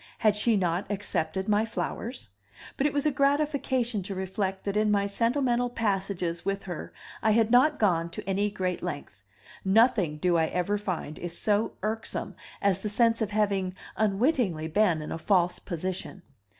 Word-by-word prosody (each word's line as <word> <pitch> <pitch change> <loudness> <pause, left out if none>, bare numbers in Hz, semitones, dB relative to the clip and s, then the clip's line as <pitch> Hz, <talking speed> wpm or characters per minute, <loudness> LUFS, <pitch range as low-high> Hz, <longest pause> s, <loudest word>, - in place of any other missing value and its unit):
Had 215 -2 +3
she 215 +1 +2
not 180 0 -1
accepted 190 -3 -2
my 210 0 +3
flowers? 225 - -4 0.4
But 275 - +2
it - - -1
was 285 +1 -1
a 300 - +3
gratification 275 -5 +1
to 195 +1 -6
reflect 190 0 -2
that 200 0 -2
in 215 0 +3
my 200 -1 +2
sentimental 245 +3 +1
passages 195 -6 -1
with 195 0 -2
her 175 -4 -6 0.3
I 220 - +2
had 225 0 +3
not 260 +5 +5
gone 170 -5 +2
to 170 - -8
any 200 +2 +1
great 185 -3 -2
length; 145 - -6 0.4
nothing, 195 -6 +3
do 175 +2 +2
I 160 -1 +2
ever 195 +5 -1
find, 180 -6 -4
is 175 -1 -6
so 210 +1 +1
irksome 220 +1 -3 0.3
as 195 -1 +2
the 210 - -2
sense 230 +2 +3
of 215 - 0
having 200 -3 0 0.2
unwittingly 210 - +1
been 170 -3 +2
in - - -7
a 165 - -4
false 180 -1 +2
position. 185 +1 -5
200 Hz, 170 wpm, -28 LUFS, 180-225 Hz, 0.4 s, not